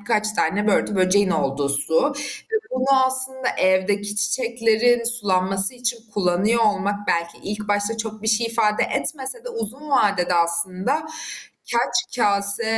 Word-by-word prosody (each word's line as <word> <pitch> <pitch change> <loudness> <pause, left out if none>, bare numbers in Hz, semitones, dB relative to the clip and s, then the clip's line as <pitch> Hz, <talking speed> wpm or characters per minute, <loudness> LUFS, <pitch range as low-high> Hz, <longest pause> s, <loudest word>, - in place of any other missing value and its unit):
birkaç 215 0 0
tane 205 +3 0
börtü 210 0 +1
böceğin 190 +1 +3
olduğu 140 -4 -1
su 160 - +2
ve 290 - -5 0.4
bunu 260 +1 +3
aslında 260 0 -1
evdeki 200 +2 +1
çiçeklerin 235 +2 +1
sulanması 195 -3 +1
için 245 -1 -2 0.2
kullanıyor 205 +4 +1
olmak 205 -1 0
belki 170 0 -1
ilk 210 0 -5
başta 205 +2 0
çok 220 -1 -5
bir - - -3
şey 225 +1 +2
ifade 225 -2 +1
etmese 285 - -2
de - - -5
uzun 260 - -5
vadede 200 -9 +2
aslında 185 - 0 0.7
kaç 240 0 0
kâse, 200 -1 +2
210 Hz, 135 wpm, -22 LUFS, 195-240 Hz, 0.7 s, böceğin